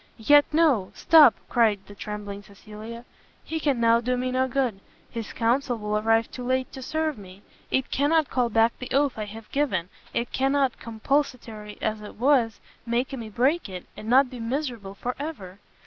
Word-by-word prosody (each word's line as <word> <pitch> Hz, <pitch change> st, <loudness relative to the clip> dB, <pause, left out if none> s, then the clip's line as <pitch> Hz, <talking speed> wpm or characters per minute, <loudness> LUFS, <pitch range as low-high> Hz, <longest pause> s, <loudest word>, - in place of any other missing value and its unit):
"Yet 290 Hz, +6 st, +6 dB
no! 300 Hz, -, +3 dB
stop! 315 Hz, -7 st, +7 dB
" -, -, -35 dB
cried 220 Hz, -4 st, +3 dB
the 205 Hz, -, -12 dB
trembling 205 Hz, -1 st, -6 dB
Cecilia, 215 Hz, +3 st, -11 dB, 0.4 s
"he 320 Hz, -, -4 dB
can 285 Hz, -5 st, 0 dB
now 230 Hz, 0 st, +4 dB
do 250 Hz, +1 st, 0 dB
me 255 Hz, +1 st, -1 dB
no 260 Hz, +1 st, +1 dB
good, 255 Hz, -6 st, -1 dB, 0.3 s
his 230 Hz, -3 st, -5 dB
counsel 245 Hz, +2 st, 0 dB
will 210 Hz, -1 st, -3 dB
arrive 225 Hz, +2 st, +2 dB
too 250 Hz, -, -7 dB
late 255 Hz, +1 st, -1 dB
to 265 Hz, -, -8 dB
serve 310 Hz, -1 st, -2 dB
me, 190 Hz, +1 st, -13 dB, 0.3 s
it 265 Hz, -, 0 dB
cannot 300 Hz, +2 st, +2 dB
call 250 Hz, -2 st, 0 dB
back 225 Hz, +1 st, +3 dB
the 255 Hz, -, -6 dB
oath 275 Hz, -3 st, +2 dB
I 215 Hz, -, -2 dB
have 215 Hz, +1 st, -11 dB
given! 200 Hz, -12 st, 0 dB, 0.2 s
it 235 Hz, +1 st, -2 dB
cannot, 270 Hz, -1 st, +1 dB
compulsatory 230 Hz, -3 st, -2 dB
as 215 Hz, -1 st, -1 dB
it 210 Hz, -, -10 dB
was, 245 Hz, -3 st, +2 dB, 0.2 s
make 240 Hz, +3 st, -1 dB
me 230 Hz, -5 st, -6 dB
break 260 Hz, +6 st, +1 dB
it, 180 Hz, -2 st, -7 dB
and 215 Hz, -, -8 dB
not 260 Hz, +1 st, +5 dB
be 250 Hz, -, -8 dB
miserable 230 Hz, -5 st, -4 dB
for 250 Hz, +5 st, -4 dB
ever!" 205 Hz, -, -7 dB
235 Hz, 185 wpm, -25 LUFS, 215-270 Hz, 0.4 s, stop